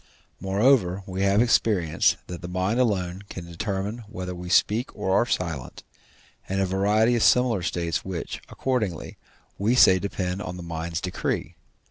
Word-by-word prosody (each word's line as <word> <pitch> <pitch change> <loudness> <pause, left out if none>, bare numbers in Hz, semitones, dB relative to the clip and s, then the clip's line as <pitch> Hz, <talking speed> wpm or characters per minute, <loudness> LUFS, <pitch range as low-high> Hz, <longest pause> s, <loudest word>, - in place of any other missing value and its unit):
Moreover, 95 -1 +2
we 95 -1 -4
have 100 +3 +4
experience, 95 -9 +2
that 90 -1 -8
the 90 - -6
mind 95 +6 -1
alone 95 -6 0
can 90 - -7
determine 95 +5 -3
whether 90 -3 -5
we 90 0 -7
speak 110 +7 +2
or 100 -2 -2
are 120 - +3
silent, 80 - -3 0.7
and 95 +1 -1
a 95 - +2
variety 105 +5 +2
of 115 - 0
similar 125 -5 +4
states 85 -1 -2
which, 95 -3 -5
accordingly, 110 - -2 0.4
we 110 +5 +2
say 95 -7 +6
depend 95 -1 -3
on 90 -2 -6
the 90 - -7
mind's 85 0 -4
decree. 90 - -3
95 Hz, 155 wpm, -25 LUFS, 90-105 Hz, 0.7 s, say